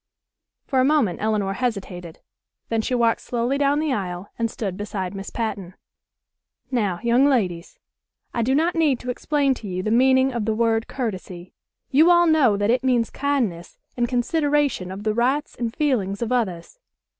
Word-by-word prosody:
For 265 - 0
a - - +4
moment 270 - +2
Elinor 210 -2 0
hesitated. 195 -7 -4 0.5
Then 225 -1 +1
she 250 - -1
walked 230 -1 +2
slowly 245 +3 -1
down 285 0 +2
the 305 -3 0
aisle 185 -3 -4
and 230 0 0
stood 200 -5 -4
beside 195 -2 -4
Miss 195 0 -6
Patten. 205 -5 -4 1.0
"Now, 205 -8 0
young 240 +4 +4
ladies, 185 -10 -1 0.6
I 235 - 0
do 260 +4 +1
not 330 +4 +2
need 305 -7 +2
to 250 - -3
explain 280 +1 +1
to 230 -4 -9
you 185 -1 -3
the 215 - -1
meaning 260 +2 +4
of 235 -3 -2
the 220 0 0
word 225 0 +1
'courtesy.' 185 -7 -5 0.4
You 310 +5 +5
all 345 0 +6
know 295 -10 +4
that 205 +2 +1
it 250 +2 +1
means 245 -3 +1
kindness 240 -12 -2 0.2
and 240 -1 0
consideration 285 - 0
of 190 +2 -7
the 215 0 0
rights 260 +6 0
and 235 -2 -3
feelings 230 -8 -1
of 235 - -4
others. 215 - -2
235 Hz, 175 wpm, -23 LUFS, 200-265 Hz, 1.0 s, all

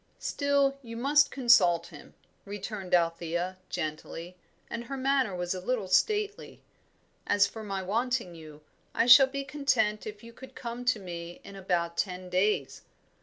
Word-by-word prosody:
"Still 280 -1 +1
you 230 -3 -8
must 285 +4 +4
consult 200 -10 +4
him," 150 -4 -14 0.3
returned 200 -2 -3
Althea, 170 +2 -1
gently, 165 +1 -5 0.3
and 235 +1 -6
her 275 +3 -5
manner 265 -6 +1
was 175 0 -2
a 185 - -5
little 220 -1 -2
stately. 415 - 0 0.6
"As 205 -1 +4
for 220 - -7
my 195 -2 -4
wanting 235 0 -1
you, 155 -2 -12 0.3
I - - +3
shall 255 +2 +9
be 275 +1 -4
content 260 -7 0
if 210 0 -8
you 230 0 -12
could 265 +3 -13
come 240 0 -6
to 250 -2 +3
me 175 -2 -8
in 200 - -11
about 175 -3 -2
ten 185 -1 -3
days. 185 -6 0
205 Hz, 155 wpm, -29 LUFS, 180-255 Hz, 0.6 s, shall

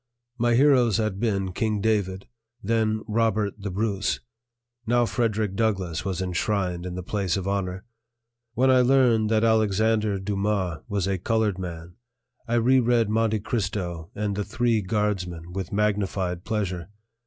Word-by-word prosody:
My 120 0 +3
heroes 125 -5 +4
had 110 -3 -1
been 100 -4 0
King 110 +1 0
David, 100 -3 0 0.4
then 110 0 +1
Robert 110 -2 +1
the 100 - -3
Bruce; 100 +1 -1 0.7
now 120 +1 +3
Frederick 110 -4 -1
Douglass 95 -7 -1
was 95 -1 -2
enshrined 90 -1 -1
in 90 - -5
the 90 - -5
place 95 -1 -1
of 95 0 -3
honor. 95 -2 -2 0.7
When 130 +2 +4
I 130 -1 +5
learned 125 -4 +4
that 110 0 +2
Alexandre 110 -1 +2
Dumas 100 -3 -1
was 100 -3 0
a 95 -1 -1
colored 110 -1 0
man, 85 0 -7 0.5
I 115 - 0
re 125 +3 +4
read 120 -3 +2
Monte 110 -1 +1
Cristo 95 -7 -3
and 105 -1 -2
The 105 - -1
Three 115 0 +1
Guardsmen 90 -4 -2
with 95 -2 -4
magnified 100 -4 -1
pleasure. 95 -5 -2
105 Hz, 145 wpm, -25 LUFS, 95-110 Hz, 0.7 s, I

